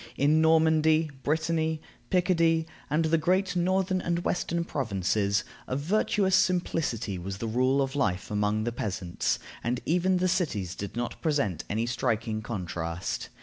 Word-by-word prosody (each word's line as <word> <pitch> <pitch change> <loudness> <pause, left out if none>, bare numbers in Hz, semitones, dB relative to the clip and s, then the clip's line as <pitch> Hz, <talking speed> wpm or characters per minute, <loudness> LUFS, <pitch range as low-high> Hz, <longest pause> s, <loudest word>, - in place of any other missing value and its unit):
In 150 +3 +4
Normandy, 160 -1 +4
Brittany, 160 +1 0 0.3
Picardy, 165 -3 +3 0.2
and 155 +3 +2
the 160 +1 +2
great 185 +3 +1
northern 185 +1 +1
and 170 0 -1
western 170 -1 0
provinces, 100 - 0 0.2
a 130 - -2
virtuous 190 +5 +2
simplicity 165 - 0
was 95 +2 -5
the 115 - -4
rule 130 +5 +2
of 135 +1 -4
life 95 -9 -1
among 105 +1 +1
the 120 - -1
peasants, 95 -6 -2 0.3
and 120 +1 0
even 180 +3 +2
the 185 +1 +1
cities 145 - -1
did 100 +2 -6
not 120 0 -4
present 140 - 0
any 110 +3 0
striking 110 -2 -1
contrast. 90 -5 -4
145 Hz, 145 wpm, -28 LUFS, 110-170 Hz, 0.3 s, In